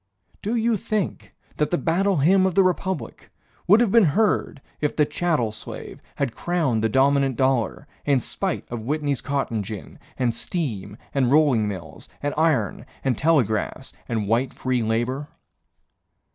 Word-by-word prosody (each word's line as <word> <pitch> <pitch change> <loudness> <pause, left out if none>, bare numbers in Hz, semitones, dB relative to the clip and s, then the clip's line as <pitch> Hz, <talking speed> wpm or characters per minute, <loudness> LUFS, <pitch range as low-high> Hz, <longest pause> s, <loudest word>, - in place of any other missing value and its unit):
Do 215 +4 -1
you 230 -1 +2
think 210 0 -3 0.2
that 150 - +1
the 175 - +1
Battle 185 +3 +1
Hymn 185 +6 +4
of 185 - -2
the 195 - +6
Republic 185 -1 -2 0.4
Would 205 +6 +7
have 230 -5 +2
been 230 -2 +6
heard 210 -8 +1 0.2
if 150 - -1
the 150 - +4
chattel 155 -10 0
slave 105 - -8
Had 140 -5 -2
crowned 155 -11 0
the 110 - +2
dominant 135 +1 +3
dollar, 130 +1 0 0.2
In 140 -3 +3
spite - - -3
of 120 - -3
Whitney's 145 +2 -1
cotton 135 -6 -1
gin, 105 0 -8 0.2
And 120 -3 +1
steam 110 - -4 0.2
and 130 -3 +2
rolling 140 -8 +4
mills 85 -7 -7
and 145 - 0
iron 145 -7 +1 0.2
And 130 -3 +1
telegraphs 130 -8 +1 0.2
and 110 -3 -1
white 120 +5 +1
free 130 -2 0
labor? 120 +6 -1
140 Hz, 155 wpm, -24 LUFS, 115-170 Hz, 0.4 s, Would